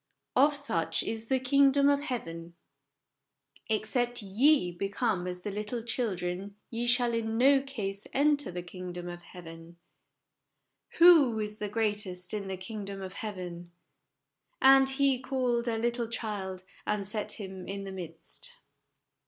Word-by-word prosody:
" -, -, -56 dB
Of 295 Hz, 0 st, 0 dB
such 230 Hz, -, 0 dB
is 225 Hz, 0 st, -4 dB
the 265 Hz, +1 st, +2 dB
kingdom 275 Hz, +2 st, +4 dB
of 285 Hz, 0 st, +3 dB
heaven." 170 Hz, -, -5 dB, 0.6 s
" -, -, -23 dB
Ex 215 Hz, 0 st, -1 dB
cept 245 Hz, -2 st, +1 dB
ye 215 Hz, +1 st, +3 dB
become 195 Hz, +1 st, -1 dB
as 180 Hz, 0 st, -6 dB
little 210 Hz, +3 st, -3 dB
children 200 Hz, -4 st, -2 dB, 0.2 s
ye 235 Hz, +1 st, -2 dB
shall 240 Hz, -1 st, +3 dB
in 225 Hz, -1 st, -1 dB
no 270 Hz, +3 st, +5 dB
case 210 Hz, -8 st, -5 dB
enter 290 Hz, -3 st, +2 dB
the 175 Hz, 0 st, -5 dB
kingdom 180 Hz, 0 st, -7 dB
of 175 Hz, 0 st, -7 dB
heaven." 170 Hz, -1 st, -12 dB, 0.6 s
" -, -, -26 dB
Who 310 Hz, -10 st, +7 dB
is 210 Hz, 0 st, -4 dB
the 210 Hz, -, -3 dB
greatest 205 Hz, -4 st, -1 dB
in 205 Hz, -2 st, -3 dB
the 190 Hz, -1 st, -4 dB
kingdom 200 Hz, 0 st, -6 dB
of 190 Hz, -1 st, -7 dB
heaven? 180 Hz, -5 st, -6 dB, 0.3 s
" -, -, -55 dB
" -, -, -49 dB
And 270 Hz, 0 st, +7 dB
He 270 Hz, -1 st, +2 dB
called 250 Hz, -2 st, -1 dB
a 230 Hz, -1 st, 0 dB
little 235 Hz, +1 st, -1 dB
child, 200 Hz, -5 st, -4 dB, 0.2 s
and 210 Hz, -1 st, 0 dB
set 210 Hz, +1 st, -1 dB
him 190 Hz, -3 st, -7 dB
in 195 Hz, 0 st, -5 dB
the 195 Hz, -, -6 dB
midst." 185 Hz, -, -7 dB
215 Hz, 155 wpm, -29 LUFS, 185-250 Hz, 0.6 s, Who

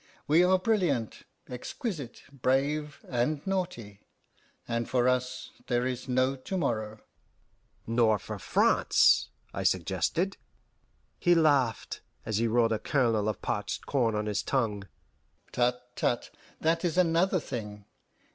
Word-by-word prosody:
We 160 Hz, +4 st, +5 dB
are 185 Hz, +1 st, +4 dB
brilliant, 180 Hz, -, 0 dB, 0.2 s
exquisite, 135 Hz, -, -6 dB
brave, 140 Hz, +3 st, -1 dB
and 135 Hz, +4 st, -1 dB
naughty; 175 Hz, -, -3 dB, 0.7 s
and 115 Hz, 0 st, -2 dB
for 125 Hz, -1 st, +2 dB
us 125 Hz, 0 st, -1 dB, 0.2 s
there 120 Hz, 0 st, +1 dB
is 130 Hz, 0 st, -4 dB
no 130 Hz, +2 st, +2 dB
to 135 Hz, +8 st, -5 dB
morrow." 110 Hz, -9 st, -2 dB, 0.8 s
"Nor 115 Hz, -2 st, +3 dB
for 95 Hz, -, -7 dB
France," -, -, +3 dB, 0.2 s
I -, -, -3 dB
suggested. 95 Hz, -, 0 dB, 0.8 s
He 175 Hz, 0 st, +4 dB
laughed, 145 Hz, -8 st, +2 dB, 0.2 s
as 110 Hz, -2 st, -1 dB
he 115 Hz, +1 st, +2 dB
rolled 115 Hz, 0 st, +3 dB
a 110 Hz, -, -1 dB
kernel 115 Hz, -6 st, +1 dB
of 110 Hz, -, -5 dB
parched 105 Hz, 0 st, -3 dB
corn 120 Hz, -6 st, +1 dB
on 105 Hz, 0 st, -1 dB
his 105 Hz, -1 st, -1 dB
tongue. 105 Hz, -7 st, -1 dB, 0.6 s
"Tut, 125 Hz, 0 st, +1 dB, 0.2 s
tut! 120 Hz, -, -1 dB, 0.3 s
that 165 Hz, +1 st, +1 dB
is 175 Hz, 0 st, 0 dB
another 180 Hz, +2 st, +3 dB
thing. 105 Hz, -7 st, -6 dB
125 Hz, 130 wpm, -29 LUFS, 115-155 Hz, 0.8 s, We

